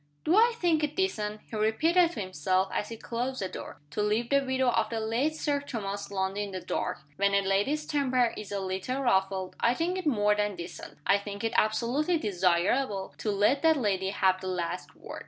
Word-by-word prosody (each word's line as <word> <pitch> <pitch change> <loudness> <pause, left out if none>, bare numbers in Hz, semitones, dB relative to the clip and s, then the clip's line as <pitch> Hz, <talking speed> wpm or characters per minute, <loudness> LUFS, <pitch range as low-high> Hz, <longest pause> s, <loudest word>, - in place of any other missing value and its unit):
"Do 325 - +3
I 470 +3 +5
think 335 -6 +2
it 300 0 -1
decent," 215 - -1
he - - -8
repeated 325 +12 +3
to - - -4
himself, 185 +1 0
as 210 - -2
he 230 - -6
closed 245 +4 -3
the 190 - -1
door, - - -8
"to 210 - -2
leave 215 +4 0
the 280 0 +4
widow 260 -1 +1
of - - +1
the 230 - -2
late 235 +8 0
Sir 290 -2 0
Thomas 205 -7 -5
Lundie 195 0 -1
in 205 - -3
the 190 -1 -5
dark? - - -3 0.2
When 200 0 +2
a 200 - +4
lady's 205 +11 +1
temper 255 -5 +1
is 210 -1 -8
a 200 - -1
little 190 +8 -3
ruffled, 190 -4 +1
I 235 +1 +3
think 355 +5 -1
it 360 - -3
more 210 -6 +3
than 210 -1 -1
decent, 175 0 -8
I 200 - +4
think 200 0 -7
it 225 - -1
absolutely 250 +10 +2
desirable, 195 - +1
to 215 - -2
let 210 +7 +2
that 320 -1 +4
lady 195 -6 0
have 190 -1 +2
the 190 - -5
last 180 -1 -3
word." - - -9
215 Hz, 210 wpm, -29 LUFS, 195-275 Hz, 0.2 s, I